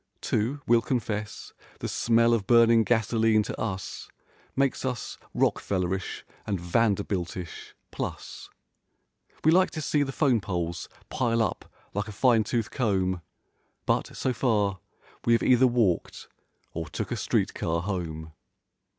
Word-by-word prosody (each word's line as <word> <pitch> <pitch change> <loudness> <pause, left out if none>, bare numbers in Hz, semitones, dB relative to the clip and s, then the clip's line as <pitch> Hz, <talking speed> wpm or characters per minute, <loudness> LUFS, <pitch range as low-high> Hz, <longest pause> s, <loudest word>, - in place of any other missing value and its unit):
Too, 120 +7 -1
we'll 115 0 +4
confess, 110 -4 -3 0.3
the - - -3
smell 115 0 +3
of 105 -4 0
burning 115 -1 +6
gasoline 110 -1 +2
to - - -5
us 95 -4 -4 0.5
Makes 135 -1 +1
us 125 -3 -4 0.2
rockfellerish 95 -1 0 0.2
and 100 -3 -1
vanderbiltish—plus. 90 -2 -3 0.9
We 160 - +5
like 185 +2 +5
to 160 - -6
see 150 -1 +1
the 135 -1 0
'phone 130 -6 +2
poles 85 -2 -3 0.2
pile 115 -2 +1
up - - -4 0.2
like 105 +1 -2
a - - -6
fine 115 0 +4
tooth 115 0 -2
comb, 95 -7 0 0.6
But, - - 0
so 130 - 0
far, 105 -6 +1 0.4
we 120 - +3
have 115 - +3
either 130 0 +5
walked 115 -8 0 0.5
or 80 -1 -4
took - - -4
a - - +1
street¬ - - 0
car 85 +1 -1
home. 80 -5 -4
110 Hz, 135 wpm, -27 LUFS, 95-120 Hz, 0.9 s, burning